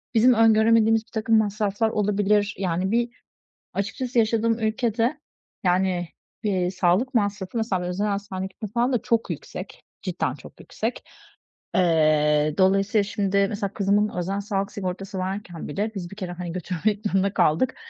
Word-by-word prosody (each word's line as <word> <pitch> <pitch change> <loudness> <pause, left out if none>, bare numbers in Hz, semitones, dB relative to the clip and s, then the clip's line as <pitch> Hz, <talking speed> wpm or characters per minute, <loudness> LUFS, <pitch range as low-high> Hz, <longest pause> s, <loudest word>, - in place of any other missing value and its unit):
bizim 245 +3 +6
öngöremediğimiz 225 0 +4
birtakım 220 0 +1
masraflar 210 +1 +1
olabilir. 205 0 +1
Yani, 185 +1 -1
bir, 235 +1 +1 0.6
açıkçası 235 +5 -1
yaşadığım 225 +1 +2
ülkede, 230 +4 0 0.5
yani, 180 -1 +1 0.4
bir 185 -3 0
sağlık 190 +8 +1
masrafı, 205 -1 -1
mesela, 205 -5 0
bir 180 - -3
özel 200 +4 -1
hastaneye 200 -2 -3
gitmek 195 +2 -9
falan 245 +2 +1
da 230 - +1
çok 230 -1 0
yüksek, - - -7 0.2
cidden - - -2
çok - - -14
yüksek. - - -4 0.7
Eee, 155 -4 +3
dolayısıyla, 195 +2 +3
şimdi, 200 -1 +1
mesela, 200 -2 -3
kızımın 205 +1 +2
özel 195 +3 -1
sağlık 200 -1 -2
sigortası 195 0 -5
varken 185 -2 -4
bile, 205 +9 -2
biz 175 -3 -5
bir 200 - -8
kere, 185 -4 -5
hani, 175 -1 -5
götürmek 190 +4 -2
zorunda 195 0 +1
kaldık, 175 +8 +2
200 Hz, 145 wpm, -24 LUFS, 185-220 Hz, 0.7 s, bizim